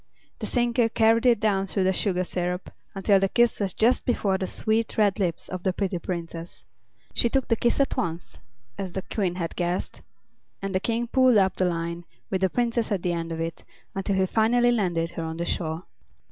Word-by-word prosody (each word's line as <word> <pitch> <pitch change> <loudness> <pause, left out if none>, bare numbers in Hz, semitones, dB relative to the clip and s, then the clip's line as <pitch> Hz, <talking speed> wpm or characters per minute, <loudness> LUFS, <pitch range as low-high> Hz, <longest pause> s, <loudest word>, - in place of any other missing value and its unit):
The - - -4
sinker 240 -1 +2
carried 225 +2 +3
it 235 -3 +5
down 195 -3 +1
through 195 0 0
the 190 +1 +3
sugar 185 -1 0
syrup 180 0 -3 0.2
until 195 0 +3
the 195 0 +1
kiss 240 +1 +3
was 195 -2 -1
just 235 +3 +3
before 195 -6 +1
the 190 - -2
sweet, 220 +3 0
red 210 -1 +3
lips 175 -4 -1
of 185 -1 -5
the 185 0 0
pretty 190 -2 -1
Princess. 170 -1 -6 0.5
She 235 - +2
took 270 +1 0
the 230 - +3
kiss 235 +4 +1
at 275 - +2
once, 170 0 -4 0.4
as 185 -3 -4
the 190 - -3
Queen 185 -5 -1
had 170 -3 -4
guessed, 175 0 -2 0.6
and 195 0 -4
the 185 - +2
King 230 +3 -1
pulled 255 -1 +4
up 190 -2 +3
the 185 - +1
line, 170 0 -2 0.3
with 190 -1 0
the 190 - +3
Princess 235 +1 0
at 195 -4 0
the 175 - +1
end 165 0 -3
of 165 - -4
it, 165 0 -4 0.3
until 195 0 -1
he 190 0 +3
finally 240 +4 +3
landed 175 -7 0
her 165 - -5
on 160 0 -4
the 170 - -2
shore. 160 0 -2
190 Hz, 210 wpm, -26 LUFS, 175-225 Hz, 0.6 s, it